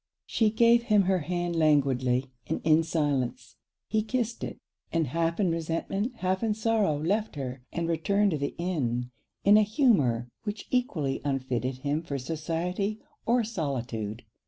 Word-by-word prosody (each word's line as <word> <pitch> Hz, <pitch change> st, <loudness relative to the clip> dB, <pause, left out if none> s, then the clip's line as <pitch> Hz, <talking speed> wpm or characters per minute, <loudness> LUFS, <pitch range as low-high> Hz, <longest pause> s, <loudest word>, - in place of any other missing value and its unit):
She 220 Hz, -2 st, +2 dB
gave 235 Hz, +2 st, +5 dB
him 210 Hz, -3 st, +4 dB
her 190 Hz, 0 st, +2 dB
hand 175 Hz, +2 st, -2 dB
languidly, 135 Hz, -5 st, +2 dB, 0.2 s
and -, -, -1 dB
in 160 Hz, 0 st, +5 dB
silence. 135 Hz, -7 st, -1 dB, 0.3 s
He 220 Hz, -, +1 dB
kissed 235 Hz, +1 st, -2 dB
it; -, -, -5 dB, 0.3 s
and 165 Hz, -1 st, +1 dB
half 165 Hz, -, -1 dB
in 185 Hz, -5 st, +3 dB
resentment, 165 Hz, +8 st, -2 dB
half 185 Hz, -3 st, -1 dB
in 220 Hz, -2 st, +1 dB
sorrow, 220 Hz, -8 st, +1 dB
left 205 Hz, +7 st, 0 dB
her, 130 Hz, -2 st, -5 dB
and 170 Hz, 0 st, -2 dB
returned 200 Hz, +5 st, +2 dB
to 155 Hz, -, -1 dB
the 140 Hz, -, -2 dB
inn, 125 Hz, -9 st, -1 dB, 0.3 s
in 205 Hz, +1 st, +7 dB
a -, -, +6 dB
humour 200 Hz, -, +2 dB, 0.2 s
which 205 Hz, -1 st, -4 dB
equally 170 Hz, -, 0 dB
unfitted 130 Hz, -2 st, -1 dB
him 145 Hz, +2 st, +1 dB
for 145 Hz, -4 st, -4 dB
society 170 Hz, +8 st, -2 dB, 0.3 s
or 240 Hz, +1 st, +3 dB
solitude. 120 Hz, -, -3 dB
165 Hz, 155 wpm, -28 LUFS, 135-210 Hz, 0.3 s, in